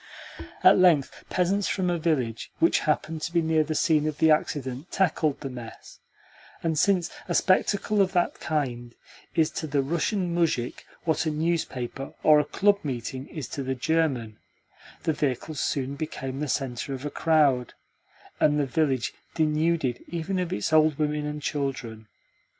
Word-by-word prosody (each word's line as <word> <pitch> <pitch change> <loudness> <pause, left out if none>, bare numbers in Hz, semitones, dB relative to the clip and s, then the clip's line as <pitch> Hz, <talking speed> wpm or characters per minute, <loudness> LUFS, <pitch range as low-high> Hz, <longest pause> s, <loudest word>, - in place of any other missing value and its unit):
At - - +7
length 170 -7 +3
peasants 190 +2 +1
from 185 -2 0
a 175 - -1
village 135 -9 -1
which 335 +1 +3
happened 155 +1 0
to 165 - -3
be 170 -1 +2
near 160 -1 +3
the 155 +1 -3
scene 155 -1 +2
of 155 -1 -3
the 160 -1 +4
accident 140 0 -1
tackled 155 -6 +1
the 135 - -4
mess; 120 -2 -10 0.6
and 165 -1 0
since 190 -4 +2 0.2
a 175 - -1
spectacle 200 +2 +2
of 190 -1 +2
that 175 -2 +1
kind 120 -6 -3 0.4
is 160 -1 +3
to 160 - -4
the 140 -1 +1
Russian 170 +4 -1
muzhik 160 -8 -1 0.2
what 160 0 0
a - - +3
newspaper 150 -5 -2
or 155 -1 +7
a 150 - +1
club 200 +4 +2
meeting 130 -1 -4
is 150 -8 -6
to 140 - -4
the 130 0 -2
German, 130 -6 0 0.6
the 160 - +1
vehicles 145 +1 -2
soon 140 0 -1
became 135 -3 -5
the 150 - -2
centre 135 0 -2
of 130 +2 -8
a 145 - -3
crowd, 145 -7 +2 0.6
and 150 0 +3
the 145 - +2
village 135 -3 0 0.2
denuded 155 -4 +1
even 175 +3 -2
of 180 -2 -2
its 105 +9 -2
old 155 -2 +5
women 150 -1 -1
and 150 0 -5
children. 130 -7 -3
150 Hz, 165 wpm, -26 LUFS, 135-165 Hz, 0.6 s, At